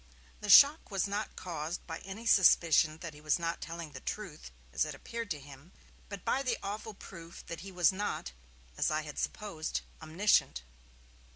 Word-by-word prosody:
The 210 Hz, -, -6 dB
shock 285 Hz, -, +8 dB
was 195 Hz, -2 st, 0 dB
not 205 Hz, +2 st, -3 dB
caused 165 Hz, -1 st, -5 dB
by 165 Hz, -1 st, -6 dB
any 195 Hz, +5 st, -9 dB
suspicion 165 Hz, -6 st, +5 dB
that 165 Hz, -2 st, -6 dB
he 150 Hz, -, -14 dB
was 155 Hz, -1 st, +2 dB
not 170 Hz, -1 st, -3 dB
telling 165 Hz, -2 st, -6 dB
the 135 Hz, -, -8 dB
truth, 170 Hz, -, -6 dB, 0.2 s
as -, -, +2 dB
it -, -, -4 dB
appeared 230 Hz, -2 st, -6 dB
to 155 Hz, -5 st, -3 dB
him, 140 Hz, +5 st, -14 dB, 0.4 s
but 200 Hz, -2 st, -8 dB
by 270 Hz, -, +1 dB
the 250 Hz, -4 st, 0 dB
awful 210 Hz, +1 st, -5 dB
proof 170 Hz, -3 st, -11 dB
that 170 Hz, -, -6 dB
he 195 Hz, +1 st, -9 dB
was 180 Hz, +1 st, +4 dB
not, 190 Hz, -, -3 dB, 0.5 s
as -, -, +2 dB
I 155 Hz, 0 st, 0 dB
had 150 Hz, -1 st, -7 dB
supposed, 190 Hz, -7 st, -3 dB, 0.2 s
omniscient. 160 Hz, -, +2 dB
175 Hz, 180 wpm, -32 LUFS, 155-205 Hz, 0.5 s, shock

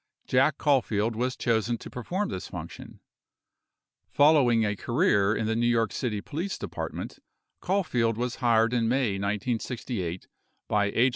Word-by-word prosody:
Jack 135 Hz, +3 st, +2 dB
Caulfield 115 Hz, -6 st, +1 dB
was 125 Hz, +3 st, -1 dB
chosen 115 Hz, 0 st, 0 dB
to -, -, -10 dB
perform 185 Hz, -, -3 dB
this -, -, -5 dB
function. -, -, -9 dB, 1.1 s
Following 140 Hz, -7 st, +4 dB
a 105 Hz, 0 st, -1 dB
career 110 Hz, -, +2 dB
in 110 Hz, -, -1 dB
the 110 Hz, +1 st, 0 dB
New 120 Hz, +1 st, +1 dB
York 115 Hz, -3 st, +2 dB
City 105 Hz, -5 st, -2 dB
Police 175 Hz, -, -4 dB
Department, -, -, -6 dB, 0.4 s
Caulfield 125 Hz, -, 0 dB
was 125 Hz, 0 st, -2 dB
hired 115 Hz, -1 st, +3 dB
in 115 Hz, -2 st, +1 dB
May 120 Hz, -6 st, +1 dB
1968 105 Hz, -2 st, -3 dB, 0.4 s
by 105 Hz, -1 st, +2 dB
H. 115 Hz, +6 st, +3 dB
120 Hz, 140 wpm, -27 LUFS, 110-130 Hz, 1.1 s, Following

